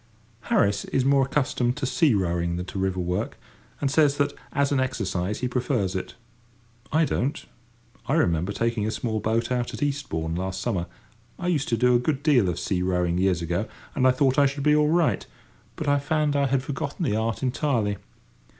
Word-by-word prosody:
Harris 100 0 +2
is 130 - 0
more 135 -1 +4
accustomed 130 -2 0
to 145 - -2
sea 130 0 +3
rowing 85 -2 0
than 90 +1 -4
to 95 +1 -5
river 95 -1 -1
work, 90 0 -2 0.4
and 135 - 0
says 145 -1 +3
that, 145 -1 +1 0.2
as 140 0 +1
an 140 - +2
exercise, 105 -6 -2
he 125 - 0
prefers 120 -6 -1
it. 95 - -4 0.8
I 160 +1 +3
don't. 140 0 -2 0.6
I 140 - +1
remember 90 - +1
taking 115 0 -1
a - - 0
small 110 -1 -2
boat 115 +3 0
out 120 -1 -1
at 110 - -3
Eastbourne 135 - -2
last 95 +2 -3
summer: 95 -7 -2 0.5
I 180 - -2
used 150 -6 0
to 115 - +1
do 125 +2 +4
a 120 - +5
good 140 +2 -1
deal 130 - +4
of 85 - -2
sea 90 0 -1
rowing 90 -1 0
years 90 -3 +1
ago, 85 +6 -1 0.3
and 130 -2 +3
I - - +6
thought 130 +1 +2
I 140 - +6
should 140 +1 -4
be 150 0 +4
all 150 0 +3
right; 165 -1 +2 0.5
but 155 - -5
I 145 0 +3
found 150 0 0
I 140 -1 +2
had 135 -1 +1
forgotten 140 +4 -3
the 105 - +1
art 110 +3 -1
entirely. 125 -6 0
125 Hz, 200 wpm, -25 LUFS, 95-140 Hz, 0.8 s, I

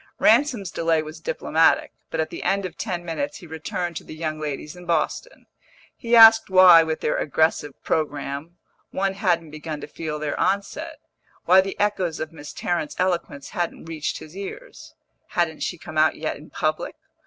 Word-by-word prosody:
Ransom's 240 - +3
delay 165 -1 +1
was 155 +1 -9
diplomatic, 160 0 +2 0.2
but 160 - -4
at 160 0 -1
the - - -6
end 195 0 0
of 180 -2 -6
ten 175 -5 -4
minutes 285 - -3
he 180 - -12
returned 170 +2 -4
to - - -7
the - - -10
young 155 -1 -3
ladies 150 +2 -5
in 180 -1 -12
Boston; 170 - -2 0.5
he 235 -1 +1
asked 225 -2 +8
why, 185 -3 +8
with 160 -1 -2
their - - 0
aggressive 155 -1 +1
programme, 145 +2 -3 0.3
one 195 0 -1
hadn't 175 -6 0
begun 155 0 -6
to - - -5
feel 155 -2 -5
their 150 -1 -3
onset, 200 0 -1 0.5
why 185 +1 +7
the 195 0 -6
echoes 190 -6 0
of 155 +1 -4
Miss 150 -2 -9
Tarrant's 170 -4 -2
eloquence 175 -6 -2
hadn't 175 -2 -3
reached 160 -2 -3
his 155 +3 -12
ears. 350 - -9 0.3
Hadn't - - -1
she - - -2
come - - -4
out - - +4
yet - - -3
in - - -13
public? - - -2
170 Hz, 175 wpm, -23 LUFS, 155-190 Hz, 0.5 s, asked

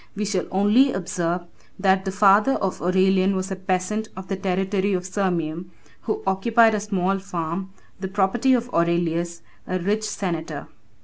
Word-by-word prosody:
We 210 +1 -2
shall 195 -3 -1
only 210 +8 +4
observe, 175 -2 -2 0.3
that 190 0 +2
the 190 - -1
father 205 +5 +5
of 195 -6 -2
Aurelian 190 +2 +3
was 190 +1 -3
a - - -1
peasant 185 +3 -2
of 190 0 -8
the 195 - 0
territory 195 +1 0
of 180 -1 -1
Sirmium, 175 -3 -2 0.4
who 215 - -2
occupied 220 +4 +4
a 210 - +1
small 195 -2 0
farm, 185 0 -4 0.3
the 190 - -3
property 205 +7 +2
of 245 0 -3
Aurelius, 170 0 0 0.2
a 185 - -1
rich 205 +4 0
senator. 170 -6 -4
190 Hz, 160 wpm, -23 LUFS, 180-205 Hz, 0.4 s, father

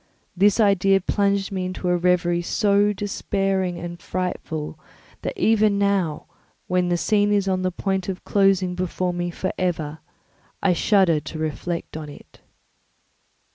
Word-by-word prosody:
This 200 +4 +3
idea 195 -2 +4
plunged 200 +1 0
me 190 -1 -2
into 185 0 -4
a 180 - +3
reverie 175 -1 +2
so 205 +3 +2
despairing 195 -2 -1
and 175 0 -7
frightful 160 -4 -4 0.4
that - - -4
even 215 -2 +3
now, 200 -6 0 0.4
when 180 -1 +1
the 175 - +2
scene 205 +2 +2
is 200 -2 +2
on 185 -1 +1
the 185 - +1
point 190 +1 -2
of 185 -1 -5
closing 195 -2 +2
before 180 0 -2
me 175 0 -2
for 185 +2 -3
ever, 160 -4 -2 0.6
I 190 - +2
shudder 180 -3 +3
to 155 - -8
reflect 160 +2 -4
on 155 -1 -6
it. 145 - -15
185 Hz, 145 wpm, -23 LUFS, 175-200 Hz, 0.6 s, idea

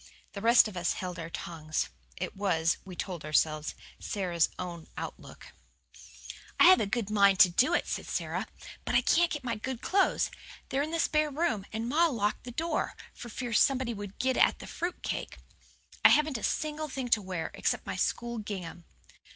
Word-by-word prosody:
The 200 - -6
rest 235 +1 +6
of 210 - -9
us 175 -1 0
held 180 -2 -5
our 165 0 -5
tongues. 155 -2 -3 0.3
It - - -4
was, 170 -5 +1
we 185 -2 -9
told 175 -3 -5
ourselves, 155 0 +1 0.2
Sara's 175 -5 0
own 175 -3 -6 0.3
lookout. - - -13 1.1
"I - - +8
have 370 +1 +8
a 205 - 0
good 220 -1 -2
mind 200 -2 +5
to 180 - +8
do 260 - +3
it," - - 0
said - - -4
Sara, - - -2 0.4
"but - - -2
I 240 - +6
can't 335 +6 +3
get 295 -3 -4
my 235 -2 -2
good 240 +3 -5
clothes; 390 +1 +2 0.4
they're 270 - 0
in 300 - -2
the 330 +1 -2
spare 305 -1 +2
room, 285 - -1
and 225 +2 -3
ma 320 +7 +4
locked 215 -8 -1
the 245 - -6
door, 320 +5 -2 0.2
for 240 - -9
fear 240 +1 -4
somebody 255 +1 +3
would 205 -2 -8
get 260 0 0
at - - +4
the - - -10
fruit 350 +1 -4
cake. - - -4 0.7
I - - +10
haven't 300 -5 +3
a - - -10
single 310 0 -2
thing 260 -2 -4
to 220 - +4
wear, 185 -4 -4
except - - -1
my - - -4
school 235 -1 -1
gingham." 180 -5 -6
220 Hz, 190 wpm, -30 LUFS, 185-275 Hz, 1.1 s, I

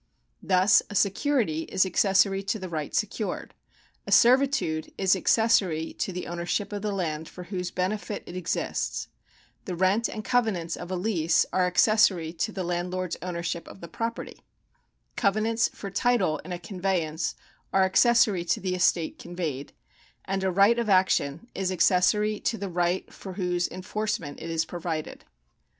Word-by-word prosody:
Thus 190 +2 +4
a 205 - -7
.security 200 - +1
is 190 0 +2
accessory 195 +1 +3
to 200 +3 -2
the 185 -3 -7
right 155 -3 -4
secured; 210 0 -2 0.5
a - - -5
servitude 245 - +3
is 190 0 +3
accessory 190 -6 +2
to - - -1
the 180 0 -5
ownership 175 +4 -3
of 205 - -3
the 210 0 -2
land 160 -5 -3
for 180 - -9
whose 180 -1 -4
benefit 205 +3 -3
it 175 - -9
exists; 180 -2 -2 0.6
the 185 - -4
rent 190 +6 +2
and 215 -1 -6
covenants 220 -10 0
of 175 - -8
a 185 - -2
lease 175 -4 +2
are 185 -1 +3
accessory 180 -3 +3
to 220 +6 -2
the 190 -3 -4
landlord's 180 +1 -2
ownership 170 -1 -4
of - - -12
the 170 - -8
property; 230 +7 -5 0.7
covenants 220 +2 +1
for 200 - -8
title 195 - +1
in 180 - -10
a 175 - -2
conveyance 175 -3 -2 0.4
are 190 - +4
accessory 210 -1 +4
to 170 - +1
the 185 -1 -2
estate 175 -2 +1
conveyed; 165 -6 -5 0.5
and 195 0 -2
a 190 - +2
right 200 +6 +4
of 230 -2 -1
action 185 -2 +2
is 190 -1 -2
accessory 190 +4 +2
to 230 - -1
the 200 -1 -4
right 175 +1 -1
for 190 - -9
whose 180 -2 -1
enforcement 185 -5 -4
it 165 - -6
is 165 0 0
provided. 165 -3 -5
185 Hz, 160 wpm, -26 LUFS, 175-210 Hz, 0.7 s, Thus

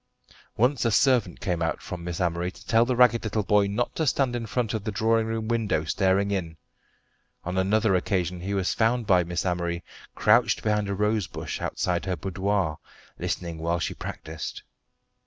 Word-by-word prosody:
Once 125 +3 +2
a 115 - +3
servant 125 +1 +3
came 90 -3 -2
out 80 - 0
from 90 -2 -7
Miss 85 -1 -4
Amory 90 0 0
to - - -14
tell 115 +1 +4
the 125 0 0
ragged 125 -1 +5
little 110 -1 -1
boy 105 0 +3
not 105 +5 -2
to 160 - 0
stand 130 -1 +1
in 115 -2 -3
front 120 0 -1
of 110 -3 -2
the 110 - -2
drawing 110 +1 +2
room 110 -1 -3
window 115 -8 0
staring 95 +4 +1
in. 85 -5 -3 0.9
On 90 +1 -4
another 100 +2 +2
occasion 90 -1 0
he 100 +2 -2
was 95 -1 0
found 115 +1 +1
by 90 -4 +4
Miss 85 +1 -3
Amory 85 -1 -1 0.3
crouched 105 -1 +3
behind 105 -2 +1
a 100 - -1
rose 105 -1 +1
bush - - -6
outside 90 -1 -1
her 95 -1 -1
boudoir, 95 -3 -1 0.4
listening 85 -2 -3
whilst 85 +1 0
she - - -3
practised. 80 0 -7
100 Hz, 185 wpm, -26 LUFS, 90-110 Hz, 0.9 s, ragged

